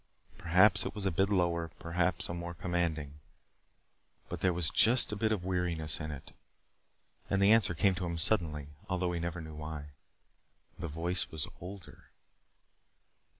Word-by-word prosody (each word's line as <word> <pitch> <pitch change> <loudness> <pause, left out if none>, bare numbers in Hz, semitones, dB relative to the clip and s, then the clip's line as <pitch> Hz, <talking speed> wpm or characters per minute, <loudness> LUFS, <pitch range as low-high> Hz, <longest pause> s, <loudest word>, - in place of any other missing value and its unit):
Perhaps 95 +4 +4
it - - -5
was 105 -2 -2
a 95 - +2
bit 95 +5 +1
lower, 85 -4 +1
a 85 +2 -6
bit 85 - -5
more 85 0 -5
commanding. 80 -4 -2 1.1
But - - -5
there 95 - +3
was 85 -4 +2
just 120 +1 +5
a - - -2
bit 110 +2 0
of 95 -5 -1
weariness 90 -5 0
in 80 -1 -5
it. 70 -3 -8 1.0
And 100 - +1
the 100 +1 +5
answer 110 -6 +4
came 95 +4 +3
to 90 0 -3
him 85 0 -3
suddenly 80 -6 0 0.2
although 90 -1 0
he 85 - -2
never 85 0 -4
knew 80 -1 -9
why. 75 -1 -7 0.9
The 85 - -3
voice 85 +3 -2
was 75 -2 -1
older! 90 0 -10
85 Hz, 160 wpm, -32 LUFS, 80-95 Hz, 1.1 s, just